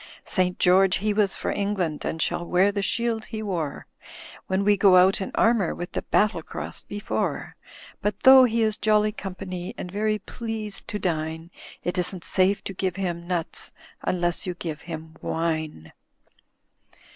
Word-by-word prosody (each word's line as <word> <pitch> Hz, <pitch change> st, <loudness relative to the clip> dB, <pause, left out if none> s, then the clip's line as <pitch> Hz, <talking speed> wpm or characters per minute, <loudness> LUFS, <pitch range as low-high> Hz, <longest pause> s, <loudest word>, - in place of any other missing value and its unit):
"St. 180 Hz, -2 st, +1 dB
George 185 Hz, +1 st, +5 dB
he 210 Hz, +1 st, 0 dB
was 205 Hz, -2 st, +2 dB
for -, -, -2 dB
England, 195 Hz, -7 st, -1 dB
And 160 Hz, -, -2 dB
shall 170 Hz, -, 0 dB
wear 180 Hz, +3 st, +3 dB
the 200 Hz, 0 st, -2 dB
shield 230 Hz, +2 st, -1 dB
he 220 Hz, 0 st, -5 dB
wore 165 Hz, -8 st, -3 dB, 0.6 s
When 190 Hz, +1 st, +1 dB
we 205 Hz, +1 st, +4 dB
go 195 Hz, -2 st, +5 dB
out 185 Hz, +2 st, +5 dB
in 190 Hz, -, -4 dB
armour. 225 Hz, -6 st, +3 dB
With 175 Hz, 0 st, -6 dB
the -, -, -2 dB
battle 205 Hz, -5 st, +1 dB
cross -, -, -6 dB
before; 205 Hz, 0 st, -3 dB, 0.5 s
But 210 Hz, -1 st, -2 dB
though 265 Hz, -1 st, +9 dB
he 230 Hz, -1 st, +1 dB
is 215 Hz, -1 st, +1 dB
jolly 215 Hz, -1 st, +3 dB
company 190 Hz, -1 st, -6 dB
And 180 Hz, -, -6 dB
very 215 Hz, +2 st, 0 dB
pleased 220 Hz, -2 st, -6 dB
to 210 Hz, -, -3 dB
dine. 160 Hz, -2 st, -3 dB, 0.3 s
It 180 Hz, +1 st, -1 dB
isn't 180 Hz, 0 st, -1 dB
safe 190 Hz, +1 st, +2 dB
to 195 Hz, -, -5 dB
give 185 Hz, -1 st, -2 dB
him 175 Hz, -3 st, -3 dB
nuts 175 Hz, -3 st, -2 dB, 0.3 s
Unless 175 Hz, 0 st, 0 dB
you 180 Hz, -, -3 dB
give 160 Hz, -3 st, -5 dB
him 160 Hz, -1 st, -7 dB
wine. 155 Hz, -, -3 dB
190 Hz, 165 wpm, -25 LUFS, 175-210 Hz, 0.6 s, though